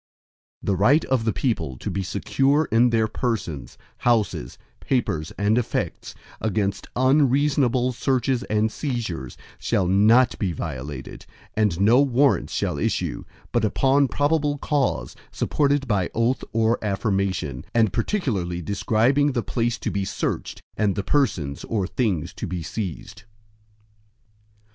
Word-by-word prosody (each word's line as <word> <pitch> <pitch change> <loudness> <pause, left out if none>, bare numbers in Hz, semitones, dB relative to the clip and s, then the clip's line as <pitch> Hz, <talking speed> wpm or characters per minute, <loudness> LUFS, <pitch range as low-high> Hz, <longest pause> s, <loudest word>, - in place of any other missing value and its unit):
IV - - -25
The 100 - +1
right 130 - +4
of 130 -4 0
the 110 - +2
people 110 - -2
to - - -5
be 95 +2 -2
secure 135 - +1
in 120 +3 +5
their 110 -2 +2
persons, 95 - -3 0.2
houses, 110 - 0 0.2
papers, 85 - -1
and 105 +3 +2
effects, 120 - -3 0.3
against 100 -2 -1
unreasonable 130 -1 +3
searches 125 0 0
and 110 +1 +1
seizures, 110 - -4 0.2
shall 95 - +1
not 110 +7 +4
be 95 -4 -1
violated, 70 -3 -6 0.3
and 105 -6 +1
no 115 +7 +5
Warrants 140 0 +2
shall - - -1
issue, - - -2 0.3
but - - +1
upon 135 +5 +3
probable 145 +1 +1
cause, 135 - -1 0.2
supported 140 -2 0
by 100 -6 +1
oath 115 +3 +1
or 115 +1 +1
affirmation, 95 - -1
and 110 -5 +3
particularly 105 - -1
describing 115 - +1
the 120 -3 -1
place 120 0 -1
to - - -3
be 100 - -1
searched, 95 - -3
and 105 -3 +1
the 100 - -2
persons 95 - 0
or 105 -4 -1
things 100 - -1
to - - -5
be 90 -1 -4
seized. 100 - -6
110 Hz, 135 wpm, -23 LUFS, 95-130 Hz, 0.3 s, in